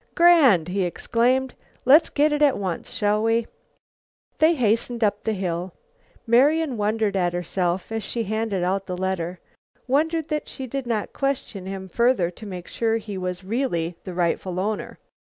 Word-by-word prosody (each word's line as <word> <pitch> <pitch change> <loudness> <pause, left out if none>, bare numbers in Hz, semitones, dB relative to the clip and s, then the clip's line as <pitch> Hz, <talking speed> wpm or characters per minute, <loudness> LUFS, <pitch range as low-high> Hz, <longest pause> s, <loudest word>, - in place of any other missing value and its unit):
"Grand!" 285 - +5
he 195 +2 -1
exclaimed. 245 +8 +1 0.3
"Let's 295 +6 +6
get 300 +1 +2
it 295 0 0
at 290 -3 +4
once, 185 -4 -4
shall 210 -3 +1
we?" 225 +1 +2 0.9
They 320 +2 +5
hastened 235 -1 0
up 205 -1 +1
the 220 - -1
hill. 180 -2 -3 0.5
Marian 275 +5 +3
wondered 210 -1 0
at 175 -2 +1
herself, 175 +2 -2
as 225 0 -2
she 230 +3 -3
handed 215 -3 -1
out 190 +2 -1
the 180 - -4
letter; 180 -1 -2 0.5
wondered 320 +4 +1
that 305 -1 -2
she 265 - -7
did 265 0 -4
not 220 -3 -2
question 255 -8 -3
him 190 0 -6
further 235 -3 +2
to 215 - -12
make 180 -3 -7
sure 225 -1 0
he 210 -2 -7
was 185 0 -4
really 185 -6 -1
the 185 - -7
rightful 180 +1 -1
owner. 210 +2 -3
215 Hz, 165 wpm, -24 LUFS, 185-255 Hz, 0.9 s, Let's